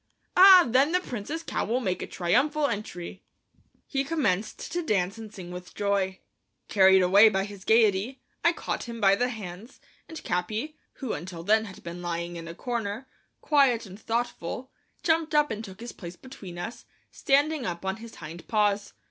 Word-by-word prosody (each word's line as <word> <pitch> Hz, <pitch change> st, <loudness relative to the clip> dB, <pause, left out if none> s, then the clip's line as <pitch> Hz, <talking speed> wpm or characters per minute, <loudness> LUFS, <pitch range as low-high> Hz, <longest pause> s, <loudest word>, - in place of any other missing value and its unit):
"Ah, 370 Hz, -1 st, +9 dB
then 265 Hz, +7 st, +3 dB
the 360 Hz, -, +4 dB
Prince's 295 Hz, -, -5 dB
cow -, -, -2 dB
will 240 Hz, +3 st, 0 dB
make 185 Hz, -7 st, -2 dB
a -, -, -4 dB
triumphal 290 Hz, -, +1 dB
entry." 190 Hz, -6 st, -4 dB, 0.6 s
He 270 Hz, -1 st, -1 dB
commenced 220 Hz, -, -1 dB
to 350 Hz, -, -1 dB
dance 200 Hz, -, 0 dB
and 220 Hz, -2 st, -9 dB
sing 180 Hz, -4 st, -9 dB
with 180 Hz, 0 st, -9 dB
joy. 200 Hz, -2 st, 0 dB, 0.5 s
Carried 190 Hz, -2 st, +6 dB
away 200 Hz, +5 st, +7 dB
by 195 Hz, -2 st, 0 dB
his 200 Hz, -2 st, -10 dB
gayety, 220 Hz, +3 st, +3 dB, 0.2 s
I 340 Hz, -, +5 dB
caught -, -, -4 dB
him 235 Hz, -1 st, -7 dB
by 195 Hz, -2 st, +5 dB
the 245 Hz, +4 st, 0 dB
hands, 210 Hz, +1 st, -8 dB, 0.3 s
and 320 Hz, -, -8 dB
Capi, 215 Hz, -, -2 dB, 0.2 s
who 260 Hz, -5 st, -4 dB
until 170 Hz, +1 st, -6 dB
then 220 Hz, +4 st, +3 dB
had 200 Hz, -3 st, -11 dB
been 170 Hz, +1 st, -7 dB
lying 170 Hz, 0 st, -3 dB
in 165 Hz, -1 st, -7 dB
a 165 Hz, -, -8 dB
corner, 235 Hz, +1 st, -4 dB, 0.3 s
quiet 270 Hz, -6 st, +3 dB
and 195 Hz, +1 st, -11 dB
thoughtful, 235 Hz, +1 st, -3 dB, 0.3 s
jumped 320 Hz, -1 st, +1 dB
up 295 Hz, -2 st, +4 dB
and 220 Hz, 0 st, -4 dB
took 190 Hz, -2 st, -10 dB
his 235 Hz, +1 st, -7 dB
place 175 Hz, -2 st, -9 dB
between 195 Hz, -7 st, -11 dB
us, 175 Hz, +7 st, -6 dB, 0.3 s
standing 285 Hz, -1 st, +1 dB
up 175 Hz, +1 st, -5 dB
on 190 Hz, +2 st, -1 dB
his 230 Hz, 0 st, -11 dB
hind 165 Hz, +2 st, -10 dB
paws. 205 Hz, -2 st, +1 dB
215 Hz, 180 wpm, -27 LUFS, 185-260 Hz, 0.6 s, Ah